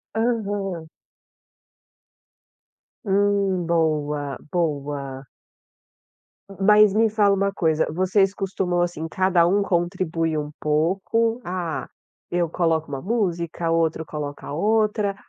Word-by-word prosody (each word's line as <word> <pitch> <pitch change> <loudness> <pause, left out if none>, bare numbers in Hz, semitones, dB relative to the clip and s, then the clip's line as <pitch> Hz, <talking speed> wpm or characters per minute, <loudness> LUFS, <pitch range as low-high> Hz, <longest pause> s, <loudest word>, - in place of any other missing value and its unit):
Aham. 205 -7 -1 2.2
Hum. 200 -2 +1
Boa. 150 -4 0
Boa. 140 -5 -2 1.2
M 195 - -11
m 195 - -1
mas 210 -1 +6
me 220 +1 +3
fala 205 -2 +3
uma 200 0 +1
coisa, 160 -3 +1
vocês 185 +3 +2
costumam, 185 -3 -1
assim, 170 -2 -2
cada 185 -1 +2
um 200 +3 +2
contribui 170 -3 -1
um 150 0 -4
pouco, 195 +10 0
ah, 175 -2 -3 0.4
eu 175 -1 0
coloco 160 -2 0
uma 135 -2 -4
música, 175 -6 -1
outro 165 -1 +1
coloca 145 -2 -6
outra, 210 +3 +1
175 Hz, 105 wpm, -23 LUFS, 160-200 Hz, 2.2 s, mas